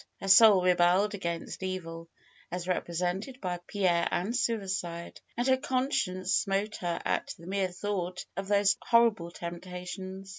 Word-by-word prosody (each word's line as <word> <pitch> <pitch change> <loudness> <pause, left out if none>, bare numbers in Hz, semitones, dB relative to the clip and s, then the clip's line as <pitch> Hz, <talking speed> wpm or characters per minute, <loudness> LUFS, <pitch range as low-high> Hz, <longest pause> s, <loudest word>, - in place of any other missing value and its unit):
Her 195 - -6
soul 195 -1 +8
rebelled 180 +3 +3
against 170 -4 -4
evil, 165 -3 -5 0.4
as 180 0 -4
represented 180 +7 -2
by 180 -4 -3
Pierre 175 -4 +1
and 205 +7 -1
suicide, 190 -8 -2 0.2
and 240 - 0
her 260 0 +4
conscience 255 -9 -1
smote 200 +2 0
her 175 -1 -2
at - - -1
the 165 - -14
mere 190 +1 0
thought 180 -1 -3
of 195 +1 -4
these 200 0 +3
horrible 230 -7 +3
temptations. 180 +2 -7
185 Hz, 140 wpm, -29 LUFS, 175-205 Hz, 0.4 s, soul